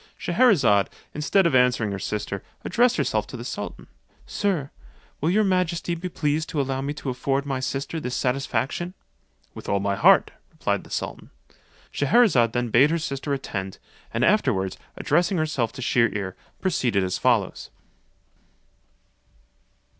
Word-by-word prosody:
Scheherazade, 145 - +3 0.2
instead 160 +6 +2
of 170 - +2
answering 125 -4 +3
her 100 - -4
sister, 100 -1 -3 0.2
addressed 245 +1 +3
herself - - 0
to - - -8
the - - -7
sultan: - - -6 0.4
"Sir, 175 -10 -1 0.5
will 155 - +1
your 210 +4 +3
majesty 180 -3 0
be 175 +2 -4
pleased 155 -1 -1
to 160 - -2
allow 135 -1 -1
me 140 +1 -2
to 140 -3 -4
afford 135 +2 -1
my 135 -2 -2
sister 135 +4 -3
this 125 -4 -4
satisfaction?" 135 - -1 0.6
"With - - -9
all 100 - +2
my 100 0 0
heart," 100 - +5 0.2
replied - - -2
the - - -15
sultan. - - -5 0.6
Scheherazade 145 - +3
then 120 -1 -1
bade 130 +6 +5
her 165 - +1
sister 140 -3 -4
attend, 95 -8 -4 0.3
and 120 +3 +1
afterwards, 125 - +2 0.2
addressing 175 +5 +1
herself 150 -8 0
to 130 - -6
Shier 120 -3 +3
ear, 95 -3 -4 0.3
proceeded 125 - +1
as 90 -1 -2
follows. - - +1
135 Hz, 145 wpm, -24 LUFS, 115-170 Hz, 0.6 s, heart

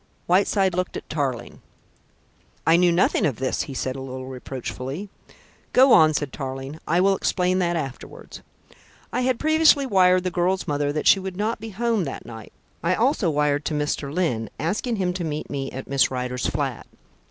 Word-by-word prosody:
Whiteside 190 +1 +2
looked 180 +1 -2
at - - -9
Tarling. 135 -6 -3 1.0
"I 165 - +5
knew 175 0 +4
nothing 170 +3 +2
of 140 -6 +1
this," 130 +3 -1
he 135 - -6
said 130 0 -2
a 135 - -6
little 130 0 -6
reproachfully. 130 - -6 0.6
"Go 260 0 +6
on," 155 -1 +6
said 140 -1 -2
Tarling. 135 +2 -6
"I 170 +3 +2
will 195 +1 +4
explain 185 -1 0
that 175 -1 +1
afterwards." 135 -6 -7 0.7
"I - - 0
had 255 -1 +1
previously 310 -2 +4
wired 185 -5 +4
the 185 - -2
girl's 180 +2 0
mother 145 -1 0
that 150 +1 -3
she 195 - +6
would 190 -1 -6
not 215 +2 -1
be 225 +1 -7
home 220 -2 0
that 135 - -6
night. 110 -2 -10 0.3
I 175 +2 +1
also 230 - +1
wired 150 -1 +1
to 155 - -1
Mr. 145 -1 -2
Lyne, 145 -10 -1
asking 210 - -1
him 185 -3 -1
to 180 -1 -4
meet 155 -1 -4
me 135 -1 -3
at 130 - -8
Miss 140 -1 +3
Rider's 125 -1 -2
flat. - - -3
165 Hz, 185 wpm, -23 LUFS, 135-190 Hz, 1.0 s, Go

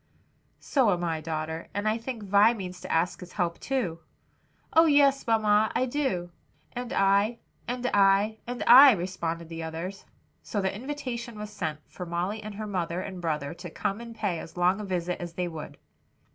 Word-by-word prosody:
"So 260 -6 +2
am 175 -1 -1
I, 165 -2 -1
daughter; 160 +1 -4
and 205 +1 -1
I 220 +2 +1
think 230 -2 -6
Vi 205 +4 +5
means 180 -3 -7
to 185 - -6
ask 165 +2 +1
his 180 0 -11
help 175 -3 -1
too?" 220 -12 -2 0.7
"Oh, 325 +1 +6
yes, 280 -3 +4
mamma, 220 -1 +3
I 255 - +2
do!" 245 -11 -2 0.4
"And 245 0 -5
I," 200 +1 +3 0.3
"and 245 +1 -3
I," 200 +2 +4
"and 245 0 -3
I," 265 +3 +10
responded 170 -3 -3
the 165 0 -6
others. 165 +4 -6 0.4
So 205 - -3
the 190 -1 -1
invitation 240 -2 -5
was 210 0 -6
sent, 160 -7 -4
for 180 - -8
Molly 180 +6 -2
and 215 -1 -7
her 215 +1 -5
mother 180 -4 -2
and 185 -1 -6
brother 150 -3 -2
to 175 +1 -9
come 195 +6 -3
and 235 -1 -9
pay 205 -7 -1
as 165 - -10
long 180 +3 +3
a - - -5
visit 180 -2 -2
as 175 -1 -6
they 180 +1 -2
would. 160 -3 -8
195 Hz, 185 wpm, -27 LUFS, 175-230 Hz, 0.7 s, I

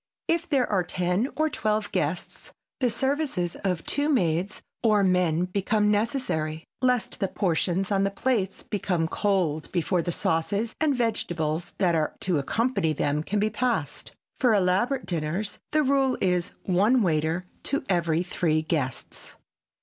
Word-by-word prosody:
If 335 0 0
there 270 -5 +3
are 190 -3 +1
ten 180 +7 0
or 310 0 +2
twelve 215 -7 -1
guests 175 -1 -3 0.3
the 255 -2 +2
services 265 - -1
of 185 -4 -2
two 290 +1 0
maids 185 - 0 0.2
or 215 -3 +4
men 180 -2 +2
become 210 +3 +1
necessary, 205 - -1 0.2
lest 250 -2 +1
the 195 - +1
portions 185 0 0
on 195 -1 +2
the 195 - +2
plates 200 -2 -1
become 180 -5 -1
cold 175 -5 0
before 175 0 +1
the 175 - -2
sauces 200 +8 0
and 300 -3 +3
vegetables 175 -8 -1
that 180 -4 +2
are 155 -2 0
to 180 -5 +1
accompany 215 - 0
them 145 +1 0
can 205 +6 -1
be 215 +1 +1
passed. 215 - -2 0.3
For 245 -4 +4
elaborate 200 +8 +1
dinners 175 +5 -2
the 305 0 +3
rule 270 -1 +2
is 180 -2 +1
one 210 +7 +3
waiter 160 +1 0 0.2
to 280 - -1
every 170 -2 +1
three 160 -3 0
guests. 135 -6 -4
190 Hz, 150 wpm, -26 LUFS, 170-230 Hz, 0.3 s, or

